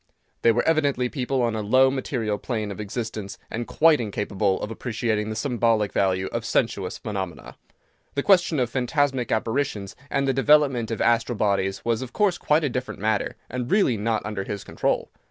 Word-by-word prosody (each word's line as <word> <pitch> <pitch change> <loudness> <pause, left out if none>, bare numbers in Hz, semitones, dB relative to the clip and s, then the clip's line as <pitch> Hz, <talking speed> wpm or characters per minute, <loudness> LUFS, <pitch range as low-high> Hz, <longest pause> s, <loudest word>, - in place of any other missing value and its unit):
They 115 - +5
were 120 +2 0
evidently 145 -6 +2
people 130 -1 -1
on 115 -2 0
a 110 - -2
low, 130 +5 +4
material 115 -6 -2
plane 110 -4 -3
of 100 - -8
existence, 105 -1 -5
and 120 +1 -3
quite 160 -3 +4
incapable 100 -2 -1
of 105 - -4
appreciating 110 -2 -2
the 110 - -3
symbolic 115 -3 +1
value 95 -1 +1
of 115 - -2
sensuous 105 -5 -1
phenomena. 95 -6 -5 0.6
The 140 - 0
question 175 -6 +4
of 120 -2 0
phantasmic 135 -1 0
apparitions, 110 -3 -1
and 140 -1 0
the 135 - +2
development 135 -4 +3
of 115 - -3
astral 115 0 +2
bodies, 100 -2 0
was 115 0 +1
of 130 -2 -7
course 200 -4 +2
quite 150 +2 +2
a - - +2
different 125 +1 -4
matter, 105 0 0
and 125 0 -4
really 195 - +3
not 110 +1 -1
under 105 -2 -3
his 100 0 -5
control. - - -1
115 Hz, 180 wpm, -24 LUFS, 105-130 Hz, 0.6 s, They